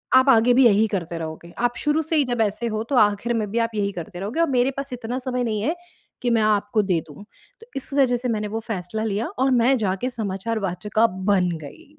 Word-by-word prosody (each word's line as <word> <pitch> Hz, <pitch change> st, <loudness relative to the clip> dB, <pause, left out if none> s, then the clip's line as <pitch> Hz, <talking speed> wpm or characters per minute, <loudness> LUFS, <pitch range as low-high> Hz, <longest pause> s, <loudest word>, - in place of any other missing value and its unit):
आप 260 Hz, +1 st, +6 dB
आगे 245 Hz, -1 st, +5 dB
भी 260 Hz, 0 st, +6 dB
यही 215 Hz, -1 st, +5 dB
करते 175 Hz, -4 st, -3 dB
रहोगे। 160 Hz, +1 st, -7 dB, 0.2 s
आप 240 Hz, -, -12 dB
शुरू 300 Hz, +1 st, +1 dB
से 320 Hz, +2 st, -2 dB
ही 295 Hz, -, +4 dB
जब 240 Hz, -2 st, -1 dB
ऐसे 220 Hz, +2 st, 0 dB
हो 215 Hz, -1 st, -2 dB
तो 280 Hz, -, 0 dB
आख़िर 210 Hz, +1 st, +3 dB
में 215 Hz, -3 st, -1 dB
भी 230 Hz, -, -2 dB
आप -, -, -20 dB
यही 200 Hz, -1 st, 0 dB
करते 175 Hz, +1 st, -7 dB
रहोगे 210 Hz, -, -4 dB
और 335 Hz, -, +3 dB
मेरे 255 Hz, 0 st, +2 dB
पास 275 Hz, 0 st, -4 dB
इतना 245 Hz, +1 st, -4 dB
समय 250 Hz, -1 st, -2 dB
नहीं 215 Hz, -3 st, -1 dB
है, 310 Hz, +10 st, 0 dB, 0.5 s
कि 245 Hz, -, 0 dB
मैं 230 Hz, -2 st, +3 dB
आपको 215 Hz, 0 st, +2 dB
दे 180 Hz, -4 st, +1 dB
दूँ, 150 Hz, +5 st, -12 dB, 0.4 s
तो 455 Hz, -, -14 dB
इस 275 Hz, 0 st, -3 dB
वजह 265 Hz, -3 st, +3 dB
से 250 Hz, +1 st, -3 dB
मैंने 210 Hz, -2 st, -1 dB
वो 220 Hz, +2 st, -3 dB
फ़ैसला 215 Hz, 0 st, -3 dB
लिया 215 Hz, +1 st, -1 dB
और 265 Hz, +1 st, +3 dB
मैं 250 Hz, +2 st, +4 dB
जाके 205 Hz, +2 st, -1 dB
समाचार 220 Hz, -1 st, -3 dB
वाचिका 210 Hz, +4 st, +1 dB
बन 190 Hz, -2 st, +1 dB
गई। 155 Hz, -, -13 dB
225 Hz, 240 wpm, -23 LUFS, 200-250 Hz, 0.5 s, आप